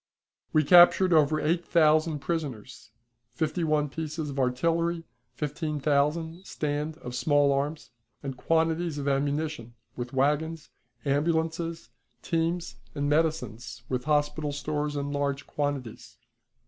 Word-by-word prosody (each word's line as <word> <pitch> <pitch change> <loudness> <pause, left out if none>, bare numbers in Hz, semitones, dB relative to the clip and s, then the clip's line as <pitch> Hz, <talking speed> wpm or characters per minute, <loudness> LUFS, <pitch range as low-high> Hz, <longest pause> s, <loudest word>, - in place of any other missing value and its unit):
We 155 - +4
captured 175 +3 +7
over 155 -1 +4
eight 170 +3 +1
thousand 155 -2 +3
prisoners, 135 -9 -4 0.4
fifty 155 +7 -2
one 150 -2 +2
pieces 155 +1 -4
of 140 - -5
artillery, 165 +6 +1 0.3
fifteen 150 +1 -3
thousand 155 +5 0
stand 150 +1 -3
of 125 - -6
small 145 +3 +3
arms, 145 +1 -3 0.3
and 135 -2 -4
quantities 165 +2 0
of 140 -1 -3
ammunition, 140 -3 -1 0.2
with 120 -1 -5
wagons, 150 +4 0 0.3
ambulances, 160 +2 -1 0.3
teams, 170 +1 -1 0.2
and 145 -1 -1
medicines 150 -7 -1
with 125 -1 -2
hospital 150 0 +1
stores 150 +1 -2
in 145 0 -2
large 140 0 -1
quantities. 140 -6 -4
150 Hz, 120 wpm, -27 LUFS, 140-160 Hz, 0.4 s, captured